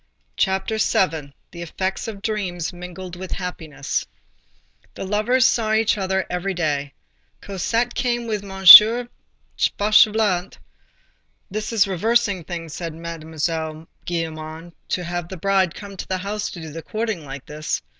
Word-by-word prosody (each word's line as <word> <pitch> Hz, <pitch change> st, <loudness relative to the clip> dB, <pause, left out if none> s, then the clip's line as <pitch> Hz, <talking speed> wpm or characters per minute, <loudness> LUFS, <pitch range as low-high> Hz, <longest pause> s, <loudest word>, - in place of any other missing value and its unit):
CHAPTER 190 Hz, +3 st, 0 dB
VII—THE 160 Hz, -4 st, -1 dB
EFFECTS 190 Hz, +5 st, -3 dB
OF 205 Hz, -2 st, -7 dB
DREAMS 185 Hz, -6 st, -3 dB
MINGLED 180 Hz, 0 st, -8 dB
WITH 185 Hz, 0 st, -6 dB
HAPPINESS 160 Hz, -6 st, -4 dB, 0.9 s
The -, -, -5 dB
lovers 215 Hz, +6 st, +2 dB
saw 220 Hz, -3 st, +2 dB
each 220 Hz, 0 st, +3 dB
other 190 Hz, -2 st, -1 dB
every 180 Hz, +2 st, -3 dB
day. 145 Hz, -5 st, -1 dB, 0.5 s
Cosette 225 Hz, +5 st, -1 dB
came 240 Hz, -2 st, -1 dB
with 215 Hz, -3 st, -3 dB
M. 195 Hz, -1 st, -8 dB, 1.1 s
Fauchelevent.—"This 210 Hz, 0 st, -1 dB
is 215 Hz, -4 st, +3 dB
reversing 205 Hz, 0 st, +1 dB
things," 165 Hz, -2 st, -6 dB
said 165 Hz, -2 st, -5 dB
Mademoiselle 160 Hz, -1 st, -4 dB, 0.2 s
Gillenormand, 165 Hz, 0 st, -5 dB
"to 180 Hz, -, -2 dB
have 175 Hz, 0 st, -4 dB
the 190 Hz, -, -7 dB
bride 190 Hz, -1 st, +1 dB
come 200 Hz, -1 st, -9 dB
to -, -, -7 dB
the 190 Hz, -, -1 dB
house 205 Hz, +3 st, -3 dB
to 175 Hz, -, -9 dB
do 160 Hz, -1 st, -8 dB
the 165 Hz, +2 st, -7 dB
courting 215 Hz, 0 st, -3 dB
like 135 Hz, -1 st, -8 dB
this." 150 Hz, -, -4 dB
185 Hz, 135 wpm, -22 LUFS, 165-210 Hz, 1.1 s, each